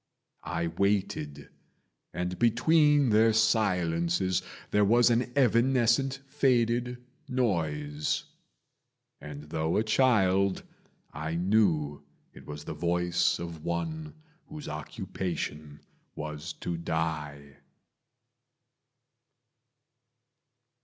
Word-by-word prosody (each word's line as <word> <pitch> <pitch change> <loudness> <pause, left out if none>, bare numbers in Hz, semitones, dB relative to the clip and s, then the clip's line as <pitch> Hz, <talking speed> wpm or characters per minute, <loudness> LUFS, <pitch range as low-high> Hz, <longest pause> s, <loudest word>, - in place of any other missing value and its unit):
I 85 0 -1
waited, 95 -4 -1 0.6
and 90 +1 -4
between 145 +3 +4
their 110 +1 +5
silences 90 -5 +1 0.3
There 105 - +4
was 120 +4 +5
an 120 +1 +1
evanescent 130 +1 +3
faded 125 -3 +1 0.3
noise; 80 - -1 1.0
And 75 0 -9
though 80 +1 0
a 110 - +2
child, 100 -5 +2 0.5
I 80 +3 -4
knew 85 -6 +1 0.3
it - - -14
was 75 0 -7
the - - -6
voice 90 +2 +1
Of 85 -2 -7
one 155 - -3 0.3
whose 155 -2 -9
occupation 75 0 -5 0.3
was 75 +2 -6
to 85 - -3
die. 75 -4 -4
90 Hz, 85 wpm, -29 LUFS, 80-120 Hz, 1.0 s, their